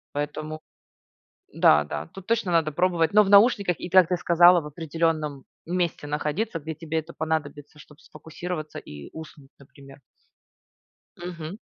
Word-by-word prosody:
Поэтому, 155 +2 -4 0.9
да, 75 0 +5
да, 75 - -6
тут 190 +2 -13
точно 225 -5 0
надо 160 -2 +2
пробовать. 175 +2 +1
Но 210 - +7
в 195 - -3
наушниках, 200 -3 +5
и - - -5
так 185 -1 +5
ты 180 - +1
сказала, 175 0 +5
в - - -12
определённом 155 -2 -2 0.2
месте 175 -4 -2
находиться, 155 +7 -2
где 160 +2 -6
тебе 160 0 -5
это 160 - -5
понадобится, 150 -2 -4
чтоб 150 +1 -17
сфокусироваться 155 0 -7
и 75 - -11
уснуть, 150 -3 -12
например. 140 0 -16 1.2
Мгм. 175 +1 -7
160 Hz, 145 wpm, -25 LUFS, 150-180 Hz, 1.2 s, Но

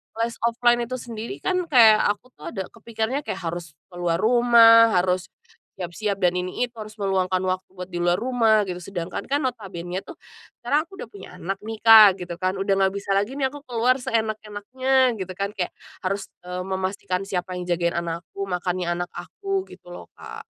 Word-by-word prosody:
les 230 +1 -1
offline 240 +1 +3
itu 255 - -4
sendiri 235 -2 -7
kan 365 -2 0
kayak 225 -7 +7
aku 230 +5 -9
tuh - - -8
ada 190 - -4
kepikirnya 230 +3 -3
kayak 280 - -4
harus 170 -2 -5 0.2
keluar 175 -1 -1
rumah, 230 0 +6
harus, 180 0 +1 0.5
siap-siap 195 +2 -3
dan 180 -1 +4
ini 185 +6 -2
itu, - - -28
harus 215 0 -8
meluangkan 190 -2 0
waktu 185 0 -2
buat 180 0 -8
di 175 - -3
luar 175 0 +2
rumah 225 -1 +2
gitu, 180 -2 -5
sedangkan 175 -2 -5
kan 285 +1 0
notabenenya 190 -7 -4
tuh, 345 - -9 0.5
sekarang 295 +7 +1
aku 390 - -13
udah - - -6
punya 190 -2 -11
anak 195 +2 -4
nih 220 0 -6
Kak, 220 -4 +9
gitu 175 -1 -7
kan, 185 +1 0
udah 195 +1 0
nggak 190 0 +2
bisa 200 0 -4
lagi 205 +6 +1
nih 265 -2 0
aku 290 - -9
keluar 250 +2 +2
seenak-enaknya 230 +3 0
gitu 185 0 -5
kan, 200 +2 -2
kayak 185 -4 -4 0.2
harus, 195 +1 -3 0.2
eee, 180 0 -4
memastikan 190 0 -3
siapa 180 -2 -3
yang 180 - -6
jagain 170 -1 +1
anakku, 170 +4 -5
makannya 180 -1 -2
anak 175 0 -4
aku, 390 -2 -4
gitu - - -14
loh - - -10
Kak. - - -10
200 Hz, 185 wpm, -24 LUFS, 180-235 Hz, 0.5 s, Kak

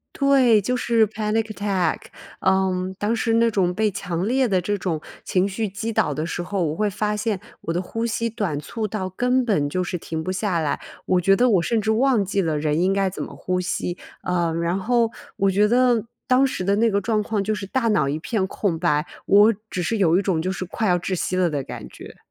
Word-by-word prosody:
对， 265 -6 +4
就 250 +6 -1
是 230 -2 +3
Panic 220 +1 -1
Attack， 200 -3 0 0.4
嗯， 190 -1 +1
当 215 +3 0
时 225 0 0
那 230 0 +4
种 190 -4 +1
被 215 +2 +1
强 180 -2 -3
烈 260 +2 +2
的 190 -5 +2
这 205 +4 -1
种 175 -5 -2 0.2
情 185 +1 +1
绪 215 +3 -2
击 205 +4 -4
倒 180 -8 +1
的 155 +3 -2
时 175 - -3
候， 190 +1 -2
我 155 +1 -3
会 210 +2 +1
发 210 +1 -1
现 210 -2 -1 0.2
我 165 - -2
的 175 - 0
呼 225 +5 -4
吸 230 0 -1
短 205 -10 -2
促 220 +8 -4
到 195 -2 -3
根 250 +7 +1
本 175 -11 +1
就 185 +4 -1
是 180 - -3
停 160 -1 -5
不 185 - -3
下 185 -1 -1
来。 150 -3 -1 0.3
我 185 -1 +3
觉 195 +3 +4
得 245 +5 +3
我 195 -7 +3
甚 225 +5 +1
至 220 +1 -1
忘 240 0 +3
记 195 +1 0
了 160 -3 0
人 150 +1 0
应 190 +1 +3
该 195 0 +1
怎 185 - -6
么 - - -7
呼 185 0 -2
吸， 180 0 -2 0.3
呃， 175 -2 0
然 170 +2 0
后 230 +3 +2 0.3
我 195 0 +2
觉 205 +2 +3
得 240 -1 +3 0.2
当 255 +2 +5
时 260 - -3
的 200 +2 +1
那 230 +2 +3
个 200 -1 +1
状 215 +1 0
况， 210 -1 -1
就 215 +2 -1
是 205 -2 -5
大 235 +3 0
脑 205 -10 +2
一 145 +2 -1
片 195 +3 -1
空 190 -3 -2
白， 155 -2 +1 0.2
我 210 +3 +6 0.2
只 180 - -2
是 225 - -1
有 180 -4 +3
一 - - +1
种 180 -5 0
就 185 +2 -1
是 190 -1 -5
快 215 +4 -2
要 180 -1 +3
窒 185 +2 -3
息 185 +1 -2
了 185 -1 +3
的 145 -4 -3
感 - - -8
觉。 - - -12
195 Hz, 280 characters per minute, -23 LUFS, 180-220 Hz, 0.4 s, 我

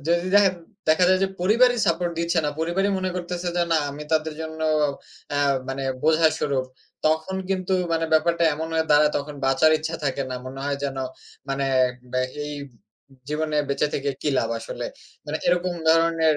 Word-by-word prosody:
যদি 170 +1 +2
দেখা 205 -2 +7 0.4
দেখা 160 +3 +5
যায়, 190 +1 +3
পরিবারই 235 +6 +4
সাপোর্ট 170 +1 +1
দিচ্ছে 170 +1 +1
না, - - +1
পরিবারই 180 +5 +1
মনে 185 0 -1
করতেছে 175 0 -3
যে 175 - +3
না, 165 - +5
আমি 145 +2 -7
তাদের 155 0 +1
জন্য 160 0 -6 0.7
অ্যাঁ 145 -1 +2 0.2
মানে 135 +1 -3 0.2
বোঝা 160 +1 +4
স্বরূপ। 135 -3 0 0.4
তখন 160 +4 0
কিন্তু, 190 -1 -1 0.2
মানে 165 0 +1
ব্যাপারটা 170 +1 +3
এমন 160 +2 -4
হয়ে 160 0 +2
দাঁড়ায় 150 0 +6
তখন 145 +1 -7
বাঁচার 135 +4 +4
ইচ্ছা 160 +1 -4
থাকে 140 0 0
না। - - -3
মনে 135 +1 -7
হয় 140 -1 -1
যেন, 135 -1 -3 0.5
মানে 135 0 -1 0.2
এ - - +6 0.3
বা 130 - +1 0.3
এই 150 - -5 0.7
জীবনে 150 0 -1
বেঁচে 140 +1 +1
থেকে 140 0 -1
কী - - 0
লাভ 115 - 0
আসলে? 115 - -6 0.4
মানে, 150 - -2
এরকম 180 0 +2 0.2
ধরনের 165 -1 +4
160 Hz, 175 wpm, -24 LUFS, 145-175 Hz, 0.7 s, দেখা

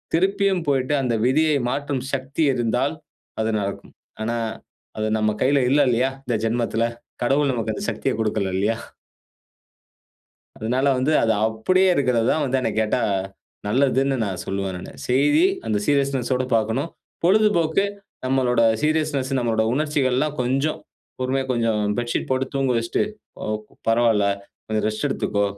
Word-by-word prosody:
திருப்பியும் 195 0 +2
போய்ட்டு, 135 +1 +1
அந்த 125 -3 0
விதியை 155 +4 +3
மாற்றும் 140 -1 -2
சக்தி 140 +3 -1
இருந்தால், 120 -3 0 0.5
அது 110 - 0
நடக்கும். 100 0 -5 0.3
ஆனா, 115 +1 -1 0.6
அது 110 0 0
நம்ம 110 0 +2
கையில 140 +1 +3
இல்ல 145 +1 +5
இல்லையா, 125 +3 +2
இந்த 120 -3 0
ஜென்மத்தில. 115 0 0 0.4
கடவுள் 140 +2 +2
நமக்கு 110 -2 -2
அந்த - - -5
சக்திய - - -2
குடுக்கல 105 -3 0
இல்லையா? 105 +4 +1 1.8
அதனால 125 +5 0
வந்து 140 +5 +1
அது 115 - +3
அப்படியே 185 +13 +2
இருக்கிறது 125 -5 +2
தான் 155 - 0
வந்து 130 0 +1
என்னை 115 - 0
கேட்டா 110 +3 +1 0.7
நல்லதுன்னு 135 +4 +2
நான் 95 -3 -4
சொல்லுவேன் 95 -1 -2
நானு. 90 - -8 0.2
செய்தி, 140 - +4 0.2
அந்த 105 - +1
சீரியஸ்னெஸ் 140 -3 +1
ஓட 130 0 0
பாக்கணும். 115 +8 0 0.4
பொழுதுபோக்கு 195 -3 +3 0.4
நம்மளோட 130 -2 +2 0.2
சீரியஸ்னெஸ், 150 -3 0
நம்மளோட 115 -3 +1
உணர்ச்சிகள், 145 -3 +1
எல்லாம் 150 +2 0
கொஞ்சம் 135 +5 0 0.4
பொறுமையா 130 +1 0
கொஞ்சம் 115 -3 +1 0.2
பெட்ஷீட் 120 0 -2
போட்டு 130 0 +1
தூங்க 135 -1 +1
வச்சிட்டு, 115 0 0 0.5
"ஓப் 110 0 -3 0.2
பரவால்ல, 115 -3 +3 0.4
கொஞ்சம் 110 -1 -1
ரெஸ்ட் 110 +7 -2
எடுத்துக்கொ. 100 -6 0
130 Hz, 140 wpm, -23 LUFS, 110-140 Hz, 1.8 s, இல்ல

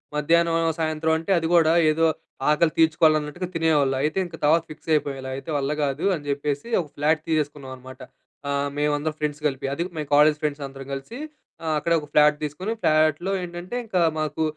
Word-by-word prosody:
మధ్యాహ్నం, 165 +2 +2 0.2
సాయంత్రం 160 0 0
అంటే 165 +4 -4
అది 165 -1 -1
గూడా 165 -1 +5 0.2
ఏదో 165 +1 +2 0.4
ఆకలి 155 +1 +3
తీర్చుకోవాలన్నట్టుగా 155 +1 +2
తినేవాళ్ళు. 150 -5 +2
అయితే 155 +4 -1
ఇంక 170 -2 -9
తర్వాత 160 +3 +4
ఫిక్స్ 160 - -14
అయిపోయాం. 145 -2 -1
ఇలా 130 - -5
అయితే 135 - -9
వల్ల 140 0 -1
గాదు 140 +3 -1
అని 150 -3 -9
జెప్పేసి 145 +4 -2
ఒక 160 - -9
ఫ్లాట్ 155 +2 +1
తీసేసుకున్నామన్నమాట. 135 -4 -4 0.5
ఆహ్, 140 0 0
మేమందరం 150 +1 0
ఫ్రెండ్స్ 150 0 -3
కలిపి. 135 -2 -4
అది 170 - -1
మేం 150 -2 -4
కాలేజ్ 150 +1 +5
ఫ్రెండ్స్ 145 -1 -2
అందరం 135 0 -10
కలిసి 135 - -7 0.5
ఆహ్, 155 - 0
అక్కడే 170 +3 +1
ఒక 150 - -10
ఫ్లాట్ 150 0 +5
తీసుకొని, 180 +9 -4
ఫ్లాట్‌లో 155 +4 +2
ఏంటంటే 175 +5 -7
ఇంకా 185 -4 0 0.2
మాకు 155 +1 -2
150 Hz, 175 wpm, -24 LUFS, 145-165 Hz, 0.5 s, గూడా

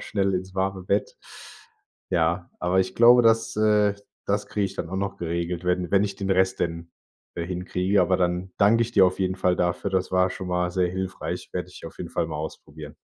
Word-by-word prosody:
schnell 100 -2 -1
ins 95 +1 -4
warme 95 0 -1
Bett." 100 +3 -1 0.9
Ja, 85 0 0
aber 90 +1 +2
ich 95 0 -2
glaube, 120 +1 +7
das, 115 0 +3
äh, 105 -1 +3 0.3
das 100 +1 0
kriege 105 - -1
ich 95 - -9
dann - - -4
auch 95 - -3
noch 100 0 -2
geregelt, 85 0 -3
wenn 90 -1 0
wenn 100 0 +5
ich 100 -1 -4
den 100 0 -3
Rest 95 0 +2
denn, 85 0 -3 0.4
äh, 85 - -3
hinkriege, 90 +2 0
aber 95 - +2
dann 90 +1 -1
dank 105 +3 +4
ich 115 0 0
dir 95 -4 +6
auf 90 +1 -2
jeden 95 0 0
Fall 90 -1 +2
dafür. 90 +3 -1
Das 95 -1 0
war 90 0 +3
schon 90 0 -6
mal 90 0 0
sehr 90 -1 +1
hilfreich. 95 0 -5
Werde - - -3
ich - - -10
auf - - -12
jeden - - -6
Fall 85 - -1
mal 80 -1 -5
ausprobieren. 75 -1 -8
95 Hz, 215 wpm, -25 LUFS, 90-100 Hz, 0.9 s, glaube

